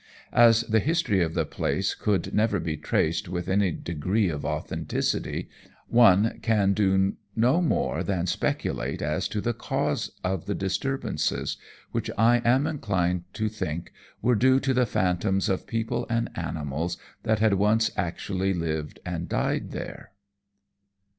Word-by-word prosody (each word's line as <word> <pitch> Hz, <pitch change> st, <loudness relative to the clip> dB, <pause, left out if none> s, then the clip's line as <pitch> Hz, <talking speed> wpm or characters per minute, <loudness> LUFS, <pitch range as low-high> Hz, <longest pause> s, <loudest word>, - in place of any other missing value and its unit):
As 115 Hz, -1 st, +6 dB
the 110 Hz, -1 st, +2 dB
history 130 Hz, -, +1 dB
of 80 Hz, 0 st, -1 dB
the 80 Hz, -2 st, +1 dB
place -, -, -1 dB
could 100 Hz, -4 st, -1 dB
never 110 Hz, +1 st, +2 dB
be 80 Hz, -2 st, -2 dB
traced 85 Hz, +4 st, 0 dB
with 90 Hz, -1 st, -3 dB
any 95 Hz, 0 st, +2 dB
degree 90 Hz, +5 st, -1 dB
of 75 Hz, -3 st, -4 dB
authenticity, -, -, -2 dB, 0.4 s
one 115 Hz, -2 st, +5 dB
can 105 Hz, -4 st, +3 dB
do 95 Hz, -1 st, +2 dB, 0.2 s
no 125 Hz, +10 st, +3 dB
more 170 Hz, -, 0 dB
than 90 Hz, -4 st, -1 dB
speculate 90 Hz, -, -2 dB
as 75 Hz, +1 st, 0 dB
to 105 Hz, -, -3 dB
the 120 Hz, +2 st, 0 dB
cause -, -, -1 dB
of 95 Hz, -2 st, -2 dB
the 100 Hz, -, -1 dB
disturbances, 135 Hz, +8 st, -1 dB, 0.3 s
which, -, -, -2 dB
I 120 Hz, +2 st, +4 dB
am 130 Hz, +4 st, +3 dB
inclined 90 Hz, -, -1 dB
to 110 Hz, -, -1 dB
think, 85 Hz, -6 st, -4 dB, 0.3 s
were 125 Hz, -, +4 dB
due 130 Hz, +4 st, +4 dB
to 135 Hz, -1 st, +1 dB
the 125 Hz, -1 st, +2 dB
phantoms 95 Hz, +1 st, +1 dB
of 95 Hz, -, -1 dB
people 115 Hz, 0 st, -2 dB
and 115 Hz, 0 st, 0 dB
animals 80 Hz, 0 st, -3 dB, 0.2 s
that 110 Hz, 0 st, +1 dB
had 110 Hz, -1 st, +3 dB
once 105 Hz, +3 st, +3 dB
actually 95 Hz, +2 st, -1 dB
lived 80 Hz, -3 st, -3 dB
and 85 Hz, -1 st, -4 dB
died -, -, -1 dB
there. -, -, -7 dB
100 Hz, 145 wpm, -26 LUFS, 90-115 Hz, 0.4 s, As